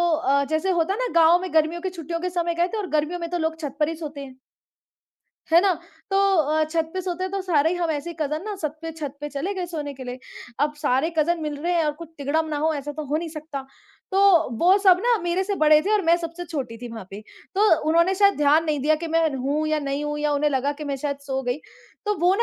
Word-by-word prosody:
अ, 280 -3 +2
जैसे 315 +4 0
होता 345 +1 +1
है 420 - -5
ना - - 0
गाँव 335 +2 +6
में 370 -3 -6
गर्मियों 320 +2 +2
की 375 - -2
छुट्टियों 335 -1 -5
के 360 +1 -2
समय 345 -1 -1
गए 345 +1 +2
थे 445 - -5
और 410 -3 -3
गर्मियों 310 +3 0
में 335 -1 -4
तो 350 - -1
लोग 320 0 -2
छत 290 -3 -5
पर 300 - +3
ही 330 - -4
सोते 300 -3 -7
हैं। 260 -1 -13 1.2
है 335 - +8
ना? 390 0 +3 0.4
तो 390 - +1 0.2
अ, 310 0 +2
छत 320 +1 -2
पे 375 - -1
सोते 365 0 -3
हैं 375 - -3
तो 395 - -1
सारे 320 -3 +2
ही 355 - -1
हम 340 -2 -1
ऐसे 315 +3 -3
कज़िन 305 +3 -1
ना 425 -1 -4
छत 305 -4 -4
पे 325 - -4
छत 290 -3 -6
पे 295 - -4
चले 300 +8 -3
गए 365 -2 -3
सोने 300 -4 -5
के 260 -1 -9
लिए। 250 +1 -6 0.4
अब 295 +1 +1
सारे 290 +1 +1
कज़िन 335 +2 +2
मिल 300 -1 -3
रहे 350 - 0
हैं 335 -2 +2
और 300 - +1
कुछ 335 - -9
तिगढ़म 295 +3 0
ना 300 - -2
हो 315 +2 +1
ऐसा 290 0 -5
तो 305 0 -5
हो 295 - 0
नहीं 335 +1 -3
सकता। 305 -3 -6 0.5
तो 390 -6 +5
वो 365 +3 +5
सब 365 -1 +7
ना 485 -1 +4
मेरे 350 +2 0
से 400 +1 -1
बड़े 305 0 +7
थे 415 +5 0
और 420 - +3
मैं 335 +1 +5
सबसे 340 +1 -6
छोटी 270 -8 -5
थी 245 +1 -7
वहाँ 220 -5 -8
पे। 200 +2 -7 0.3
तो 420 +2 +4 0.2
उन्होंने 335 +4 +4
शायद 400 +1 +4
ध्यान 295 +2 +4
नहीं 305 -3 -1
दिया 305 +3 +3
कि - - -2
मैं 330 -1 +4
हूँ 280 +4 -1
या 310 0 +1
नहीं 280 +1 -2
हूँ 295 0 -3
या 295 0 0
उन्हें 290 +1 +1
लगा 275 +1 0
कि - - -4
मैं 280 -1 -2
शायद 280 +1 -3
सो 265 0 -1
गई। 245 +2 -2 0.5
तो 420 -3 0
वो 355 +3 +4
315 Hz, 270 wpm, -24 LUFS, 290-350 Hz, 1.2 s, है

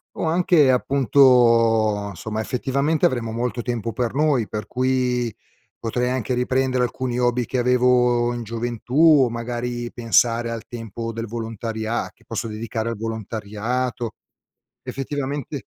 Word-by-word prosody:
o - - -2
anche 165 -4 +4
appunto 115 -5 +4
somma 110 +5 -4
effettivamente 140 +6 0
avremo 115 -3 0
molto 120 +1 -2
tempo 115 -1 -3
per 120 -3 -1
noi 140 -5 +2
per 105 0 -5
cui, 125 -3 0 0.5
potrei 125 +2 -1
anche 130 -1 -1
riprendere 130 0 +1
alcuni 125 0 -2
hobby 120 -1 +1
che 130 - -3
avevo 125 -1 +3
in 120 -1 -4
gioventù 115 +2 -5 0.3
o 120 - +1
magari 120 +1 -4
pensare 115 0 +2
al 115 -1 -5
tempo 115 0 -6
del 115 +1 -4
volontaria 115 0 -4
che 115 - -28
posso 115 0 -4
dedicare 110 +1 -3
al 115 - -4
volontariato. 115 +2 -3 0.7
Effettivamente 140 0 -4
120 Hz, 130 wpm, -22 LUFS, 115-125 Hz, 0.7 s, anche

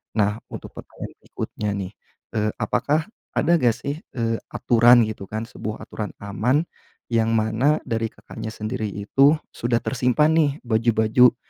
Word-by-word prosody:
Nah, 105 -1 +2 0.2
untuk - - -7
pertanyaan - - -8
berikutnya, 105 - -5
nih, 95 -2 -4 0.5
eee, 105 0 +1
apakah 145 +8 +1 0.3
ada 170 +1 +4
enggak, 120 -4 +3
sih, 140 +5 -4 0.2
eee, 115 -2 0 0.2
aturan 120 0 +6
gitu, 110 -2 -6
kan, 110 +3 -4
sebuah 110 -2 -6
aturan 105 -1 -5
aman 120 +9 +1 0.5
yang 115 -1 +2
mana 115 +8 +2
dari 115 0 -1
Kakaknya - - -9
sendiri 110 +1 -3
itu 135 +9 +3 0.2
sudah 120 0 0
tersimpan, 130 +4 +2
nih, 155 -3 +4
baju-baju, 115 +1 +4
115 Hz, 140 wpm, -23 LUFS, 110-125 Hz, 0.5 s, aturan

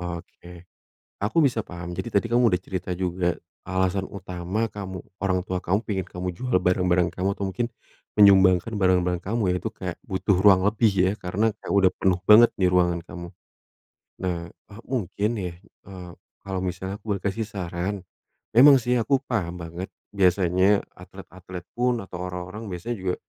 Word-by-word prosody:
Oke. 85 0 -12 0.6
Aku 105 +11 -1
bisa 120 -4 +1
paham 90 -2 -8
jadi 120 - -4
tadi 100 - +1
kamu 120 -1 +5
udah 90 - +2
cerita 95 -1 -5
juga 90 -1 -1 0.3
alasan 95 0 0
utama 95 +2 -3
kamu 95 -2 -6 0.2
orang 95 -2 0
tua 95 -2 -3
kamu 100 +6 0
pengen 95 -4 -3
kamu 90 0 -4
jual 125 +4 0
barang-barang 90 -1 +2
kamu 95 +2 -1
atau 100 - -2
mungkin 105 +5 -2 0.5
menyumbangkan 95 0 +6
barang-barang 90 -3 +2
kamu 100 -1 0
ya, - - 0
itu - - -3
kayak - - -6
butuh 95 +2 0
ruang 95 -2 +6
lebih 110 +2 +3
ya 95 -1 +2
karena 105 +5 0
kayak - - -4
udah 95 -2 +5
penuh 95 -2 +1
banget 115 +3 +8
di 95 - +2
ruangan 90 -1 +2
kamu. 85 -1 -8 0.9
Nah, 85 -2 -3
eee, 105 +6 -16
mungkin 105 -4 -2
ya, 90 -3 -4 0.3
eee, 90 -2 -9 0.3
kalau 95 -1 -4
misalnya 95 +2 -4
aku 110 - -3
boleh 95 - -10
kasih 105 +3 -1
saran, 95 0 -4 0.6
memang 140 +3 +9
sih 125 +1 0
aku 135 +5 +2
paham 90 -9 -3
banget 85 +3 -6 0.3
biasanya 95 +1 +3
atlet-atlet 90 0 -11
pun 120 -1 +1
atau 90 - -8
orang-orang 90 +4 -6
biasa 90 +7 -4
juga, 95 -2 -2
95 Hz, 165 wpm, -25 LUFS, 90-105 Hz, 0.9 s, memang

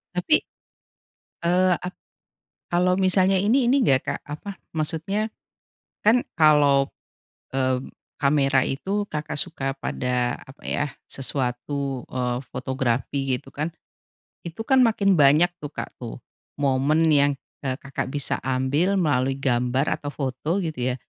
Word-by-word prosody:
Tapi, 180 - +3 1.0
eee, 180 +2 +4
ap 180 - -6 0.8
kalau 180 +1 +2
misalnya 190 0 +4
ini, 235 +7 +3
ini 270 +3 +4
nggak 135 - +4
Kak? - - -3
Apa, 155 +7 -6 0.2
maksudnya 165 +7 -1 0.8
kan 230 +4 +4
kalau, 145 -3 +5 0.7
mmm, 130 -1 0 0.3
kamera 140 -2 +3
itu 195 +10 -2
Kakak 150 -4 -4
suka 135 -2 -2
pada 125 -2 -1
apa 135 +1 -16
ya, 145 - 0 0.2
sesuatu, 135 0 -2
eee, 125 -1 -1
fotografi 130 +1 -1
gitu 135 - -16
kan. 150 +3 -1 0.8
Itu 170 +6 -6
kan 265 -1 +5
makin 210 -4 +3
banyak 155 +4 +5
tuh 145 - -5
Kak - - -6
tuh, 120 -2 -6 0.4
momen 140 +3 +2
yang, 145 0 +4 0.3
eee, 130 -1 -1
Kakak 135 -1 -4
bisa 145 -1 -1
ambil 135 +9 +1
melalui 135 -5 +1
gambar 130 +1 +1
atau 145 - -6
foto 140 +5 -2
gitu 150 -8 -2
ya, - - -2
145 Hz, 130 wpm, -24 LUFS, 130-175 Hz, 1.0 s, kalau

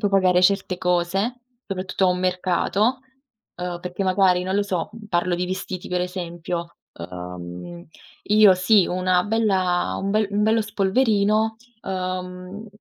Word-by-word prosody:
puoi 205 - +1
pagare 185 -2 +4
certe 190 -1 +2
cose, 180 +7 0 0.3
soprattutto 190 0 -2
a - - +4
un 180 0 +1
mercato, 185 +6 +1 0.6
uhm, 175 -1 -3
perché, 180 +2 -4
magari 185 -1 +3
non 190 +2 -1
lo 205 - +3
so, 180 -4 -2 0.2
parlo 175 -1 +1
di 180 +1 -2
vestiti 185 -1 -5
per 180 0 -1
esempio: 175 -1 -5 0.2
uhm, 90 - -8 0.4
io 210 -2 +6
sì, 185 +1 +4
una 180 0 +1
bella 190 -4 +1
un 195 - -1
bel 215 +1 +2
un 205 +1 0
bello 220 +1 +3
spolverino, 215 +1 +1 0.3
uhm, 185 +2 -5
185 Hz, 140 wpm, -23 LUFS, 180-200 Hz, 0.6 s, io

